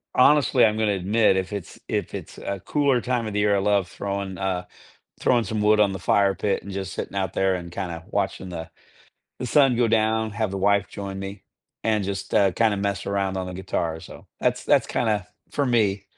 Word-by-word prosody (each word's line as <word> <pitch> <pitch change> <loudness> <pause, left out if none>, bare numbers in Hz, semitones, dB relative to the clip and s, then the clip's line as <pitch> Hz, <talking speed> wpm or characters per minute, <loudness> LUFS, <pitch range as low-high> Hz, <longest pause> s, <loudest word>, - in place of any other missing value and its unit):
honestly, 145 0 +5
I'm 110 -1 +4
gonna 110 -2 +2
admit, 100 +2 +2
if 95 0 -2
it's 100 -4 -6
if - - -2
it's - - -7
a 100 -2 -4
cooler 140 -1 +1
time 120 -2 -1
of 105 - -5
the 105 - 0
year, 105 0 +3
I - - +2
love 100 -2 +2
throwing 100 -1 -4
uh, 95 -2 -2 0.5
throwing 120 -2 +3
some 110 +2 -2
wood 105 0 +4
on 100 -2 +4
the - - -4
fire 100 +2 +3
pit, 100 0 -1
and 100 - -8
just 95 0 -4
sitting - - -5
out 95 -3 -1
there, 95 -1 +2
and 85 -1 -6
kinda 85 -3 -5
watching 95 - -2
the 85 -2 -6 0.7
the 125 - -3
sun 135 0 +4
go 120 0 +3
down, 110 0 +2
have 105 0 -2
the 100 - -4
wife 100 +1 +2
join 100 -1 -6
me, 95 0 -7 0.4
and 110 -2 +2
just, 95 0 -4
uh, 100 -1 +5
kinda 110 +2 +2
mess 100 0 -2
around 100 -1 -1
on 95 -1 -3
the 90 - -6
guitar, 85 -3 -2
so, 85 - -12
that's - - 0
that's - - +3
kinda 105 -5 0 0.2
for 145 - 0
me. 105 -5 +2
100 Hz, 215 wpm, -24 LUFS, 95-110 Hz, 0.7 s, honestly